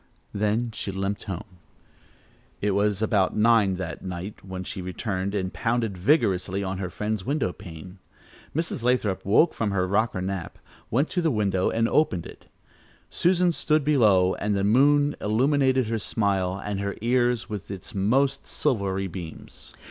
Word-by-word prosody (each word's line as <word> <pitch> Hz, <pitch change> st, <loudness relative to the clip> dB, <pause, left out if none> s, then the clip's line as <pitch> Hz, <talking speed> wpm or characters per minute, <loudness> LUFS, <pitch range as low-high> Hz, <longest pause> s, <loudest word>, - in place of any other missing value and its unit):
Then 105 Hz, +3 st, 0 dB
she 105 Hz, -, -3 dB
limped 100 Hz, +1 st, -3 dB
home. 95 Hz, -1 st, -7 dB, 1.0 s
It 105 Hz, -, 0 dB
was 105 Hz, +1 st, +1 dB
about 100 Hz, -3 st, +2 dB
nine 105 Hz, -3 st, +4 dB
that 90 Hz, -2 st, -6 dB
night 95 Hz, +2 st, -6 dB
that 95 Hz, -1 st, -6 dB
she 95 Hz, -, -5 dB
returned 95 Hz, +1 st, -3 dB
and 95 Hz, -2 st, -2 dB
pounded 115 Hz, -3 st, -1 dB
vigorously 95 Hz, -, +1 dB
on 95 Hz, 0 st, -3 dB
her 90 Hz, -2 st, -3 dB
friend's 105 Hz, +2 st, -3 dB
window 130 Hz, -, -1 dB
pane. 90 Hz, -1 st, -11 dB, 0.6 s
Mrs. 165 Hz, -5 st, -1 dB
Lathrop 120 Hz, -6 st, +1 dB
woke 135 Hz, -, +4 dB
from 110 Hz, -, -1 dB
her 95 Hz, -2 st, +1 dB
rocker 105 Hz, +1 st, 0 dB
nap, 95 Hz, -2 st, -4 dB, 0.3 s
went 140 Hz, +7 st, +1 dB
to 180 Hz, -, 0 dB
the 165 Hz, -, +2 dB
window 100 Hz, -7 st, +1 dB
and 115 Hz, 0 st, +1 dB
opened 105 Hz, -, +1 dB
it. -, -, -12 dB, 0.6 s
Susan 180 Hz, 0 st, +3 dB
stood 155 Hz, -2 st, +1 dB
below 105 Hz, -11 st, +4 dB
and 105 Hz, -1 st, -1 dB
the 100 Hz, -, 0 dB
moon 145 Hz, +7 st, +4 dB
illuminated 130 Hz, +3 st, +2 dB
her 110 Hz, +1 st, -2 dB
smile 100 Hz, -3 st, 0 dB
and 105 Hz, -1 st, -2 dB
her 100 Hz, 0 st, -3 dB
ears 120 Hz, 0 st, +1 dB
with 105 Hz, -3 st, -6 dB
its 95 Hz, -2 st, -7 dB
most 125 Hz, +8 st, +1 dB
silvery 95 Hz, -4 st, 0 dB
beams. 85 Hz, -3 st, -9 dB
105 Hz, 155 wpm, -25 LUFS, 95-120 Hz, 1.0 s, nine